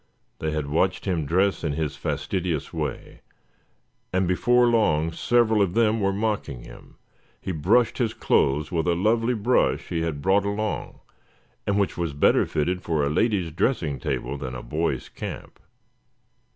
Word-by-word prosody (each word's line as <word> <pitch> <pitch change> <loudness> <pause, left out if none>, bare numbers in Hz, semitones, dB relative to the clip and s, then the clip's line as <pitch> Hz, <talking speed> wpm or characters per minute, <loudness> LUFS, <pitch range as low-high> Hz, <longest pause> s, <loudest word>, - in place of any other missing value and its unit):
They 80 - -2
had 75 -1 -2
watched 85 +6 0
him 85 -7 -1
dress 95 +4 +1
in 75 -3 -1
his 75 -1 -2
fastidious 90 -6 -3
way, - - -5 0.9
and 95 0 +1
before 120 +7 +3
long 85 -10 +2
several 110 +3 +2
of 95 -3 +1
them 115 -1 +3
were 100 0 +2
mocking 100 - -2
him. - - -14 0.4
He - - -4
brushed 110 - +2
his 115 -3 0
clothes 75 +3 +1
with 85 0 0
a 85 - +3
lovely 115 +6 +1
brush 115 +4 +1
he 85 - -1
had 80 -3 -2
brought 95 +6 +3
along, 100 +1 -3 0.7
and 100 0 +1
which 100 -2 0
was 85 -4 -1
better 70 - +3
fitted 90 +5 -1
for 80 -4 0
a 70 - 0
lady's 95 -2 +1
dressing 80 - 0
table 65 +3 -3
than 65 -2 -5
a 60 - -6
boys' 75 0 -2
camp. - - -8
90 Hz, 160 wpm, -25 LUFS, 75-105 Hz, 0.9 s, before